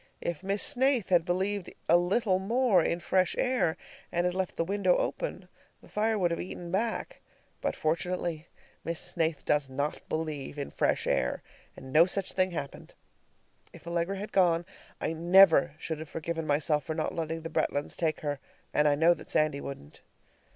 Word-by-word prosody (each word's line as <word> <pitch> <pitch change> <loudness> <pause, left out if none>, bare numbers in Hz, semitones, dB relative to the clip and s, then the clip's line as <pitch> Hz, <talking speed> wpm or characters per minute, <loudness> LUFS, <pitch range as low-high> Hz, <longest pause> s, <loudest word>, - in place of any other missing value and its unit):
If 170 -1 -3
Miss 195 +1 -1
Snaith 265 -5 +1
had 175 -3 +4
believed 190 +2 -1 0.2
a 170 - +6
little 185 +3 +2
more 220 -2 +3
in 170 - 0
fresh 185 +2 +1
air 250 -11 +1 0.3
and 175 +1 +1
had 180 - +1
left 185 -1 -2
the - - 0
window 185 0 +2
open, - - -3 0.3
the - - -18
fire 220 +1 0
would 175 -4 +1
have 170 - -1
eaten 175 -1 -7
back. 230 - -2 0.4
But - - -1
fortunately 170 0 -2 0.4
Miss 165 0 -3
Snaith 165 -3 -1
does 145 -2 +1
not 140 +3 -2
believe 155 -3 -3
in 140 - -4
fresh - - 0
air, 60 - 0 0.3
and 130 0 -10
no 165 +3 +7
such 190 0 -2
thing 185 0 +2
happened. 145 -6 -7 0.8
If - - -14
Allegra 170 +3 -1
had 205 +2 -6
gone, 175 -3 +3 0.3
I - - -1
never 170 -2 +6
should 160 -1 -4
have 155 -1 -8
forgiven 165 0 -4
myself 150 0 +1
for 155 - -3
not 155 - -2
letting 165 0 -3
the 165 - -6
Bretlands 145 -2 -1
take 160 -3 -1
her, 145 -2 -2 0.3
and 150 0 +4
I 145 - +4
know 165 +4 +5
that - - -12
Sandy 155 -2 +1
wouldn't. 75 - -9
170 Hz, 180 wpm, -29 LUFS, 155-190 Hz, 0.8 s, no